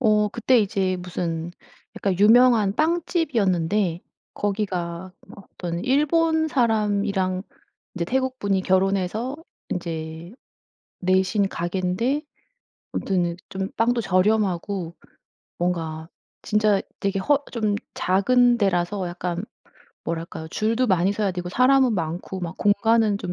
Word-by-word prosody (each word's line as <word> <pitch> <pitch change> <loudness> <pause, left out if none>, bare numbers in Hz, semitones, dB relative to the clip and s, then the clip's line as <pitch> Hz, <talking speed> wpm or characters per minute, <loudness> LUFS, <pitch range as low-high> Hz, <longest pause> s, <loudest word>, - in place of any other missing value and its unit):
어 215 -3 +3
그때 240 +3 +2
이제 190 -2 0
무슨 170 -2 -4 0.5
약간 190 -3 -1
유명한 220 -1 +5
빵집이었는데 210 - +1 0.3
거기가 185 -3 -3 0.2
어떤 175 -3 -6
일본 315 +4 +2
사람이랑 205 -6 +1 0.5
이제 175 -3 -2
태국 260 +6 -1
분이 195 -2 0
결혼해서 195 +7 0 0.3
인제 165 0 -5 0.7
내신 190 +2 +2
가게인데 185 - -1 0.7
아무튼 175 -3 -1
좀 190 0 -4
빵도 235 +2 +2
저렴하고 190 -2 0 0.6
뭔가 165 -2 -2 0.3
진짜 210 -2 +2 0.2
되게 200 -1 0
허 285 +8 +1
좀 215 -3 0 0.2
작은 240 +6 +3
데라서 190 -1 0
약간 175 +1 -4 0.6
뭐랄까요. 165 -1 -5
줄도 225 +7 0
많이 185 -2 +2
서야 205 -1 0
되고 180 0 -5
사람은 255 +3 +4
많고 175 +2 -4
막 175 0 -5
공간은 215 +1 +3
좀 180 - -4
195 Hz, 240 characters per minute, -23 LUFS, 180-225 Hz, 0.7 s, 유명한